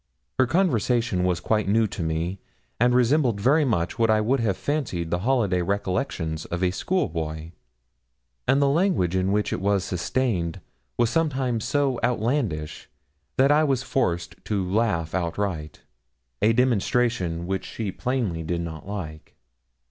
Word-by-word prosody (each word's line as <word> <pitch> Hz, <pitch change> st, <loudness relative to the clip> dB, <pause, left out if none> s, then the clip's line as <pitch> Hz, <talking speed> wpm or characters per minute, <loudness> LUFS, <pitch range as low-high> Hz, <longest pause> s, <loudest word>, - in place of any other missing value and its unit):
Her 130 Hz, -, +5 dB
conversation 120 Hz, -, +1 dB
was 90 Hz, -2 st, +1 dB
quite 105 Hz, +3 st, 0 dB
new 110 Hz, +3 st, +3 dB
to 95 Hz, -, -5 dB
me, 85 Hz, +4 st, -2 dB, 0.4 s
and 125 Hz, +1 st, +4 dB
resembled 125 Hz, -3 st, +3 dB
very 140 Hz, +9 st, +4 dB
much 110 Hz, -5 st, -1 dB
what 115 Hz, -1 st, +3 dB
I 110 Hz, 0 st, +4 dB
would 125 Hz, +6 st, +1 dB
have 105 Hz, -5 st, 0 dB
fancied 115 Hz, -, -2 dB
the 85 Hz, -, +1 dB
holiday 105 Hz, -5 st, +1 dB
recollections 90 Hz, -, -2 dB
of 85 Hz, +2 st, -3 dB
a 90 Hz, -, +3 dB
schoolboy; 80 Hz, -, -2 dB, 1.0 s
and 135 Hz, -, +4 dB
the 140 Hz, -, +4 dB
language 145 Hz, -, +2 dB
in 95 Hz, +1 st, +1 dB
which 105 Hz, +1 st, 0 dB
it -, -, -3 dB
was 100 Hz, -1 st, +2 dB
sustained 95 Hz, -2 st, -1 dB, 0.4 s
was 120 Hz, -1 st, +2 dB
sometimes 130 Hz, -8 st, 0 dB
so 140 Hz, -4 st, +1 dB
outlandish, 115 Hz, -, -1 dB, 0.5 s
that 135 Hz, +2 st, +5 dB
I 150 Hz, +1 st, +5 dB
was 135 Hz, -4 st, +1 dB
forced 90 Hz, -11 st, -2 dB
to 100 Hz, -4 st, -1 dB
laugh 95 Hz, -6 st, 0 dB
outright 85 Hz, -3 st, -2 dB, 0.6 s
a 110 Hz, -, +5 dB
demonstration 115 Hz, -7 st, +1 dB
which 95 Hz, +1 st, -2 dB
she 110 Hz, -4 st, -4 dB
plainly 120 Hz, -9 st, -2 dB
did 85 Hz, +1 st, -2 dB
not 80 Hz, 0 st, -7 dB
like. 85 Hz, -7 st, -7 dB
105 Hz, 150 wpm, -25 LUFS, 90-125 Hz, 1.0 s, Her